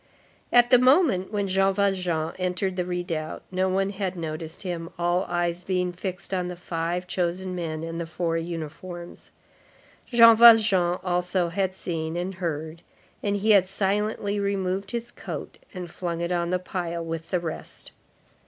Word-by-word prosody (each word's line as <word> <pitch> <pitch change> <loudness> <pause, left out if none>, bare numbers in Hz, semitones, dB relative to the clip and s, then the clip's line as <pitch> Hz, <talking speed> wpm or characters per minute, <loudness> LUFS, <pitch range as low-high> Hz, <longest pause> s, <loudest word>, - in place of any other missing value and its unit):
At 245 +1 +5
the 250 - +8
moment 255 - +4
when 205 -2 -1
Jean 195 0 +2
Valjean 180 -5 0
entered 185 +1 -1
the 180 -1 -1
redoubt, 175 -3 -3
no 185 0 +1
one 195 +1 +1
had 190 -2 -3
noticed 160 0 -6
him, 170 -3 -4
all 175 +2 +1
eyes 175 0 -1
being 180 -1 -1
fixed 185 +1 -5
on 180 -1 0
the 180 - -5
five 175 0 -3
chosen 180 +1 -2
men 160 -3 -4
and 165 +1 -4
the 165 - -4
four 165 0 -2
uniforms. 170 +1 -6 0.8
Jean 230 -2 +8
Valjean 215 -6 +6
also 180 -1 0
had 190 +1 -1
seen 165 -2 -3
and 180 +2 -3
heard, 160 -1 -3 0.4
and 205 -1 0
he 210 +2 +2
had 200 -3 +6
silently 205 +1 -1
removed 195 -1 -1
his 235 +1 -4
coat - - -7
and 180 -3 -7
flung 175 -1 -3
it 170 +1 -2
on 170 -1 0
the 185 - +2
pile 170 -2 -4
with 165 0 -5
the 180 - +1
rest. 165 -2 -6
180 Hz, 160 wpm, -25 LUFS, 170-195 Hz, 0.8 s, the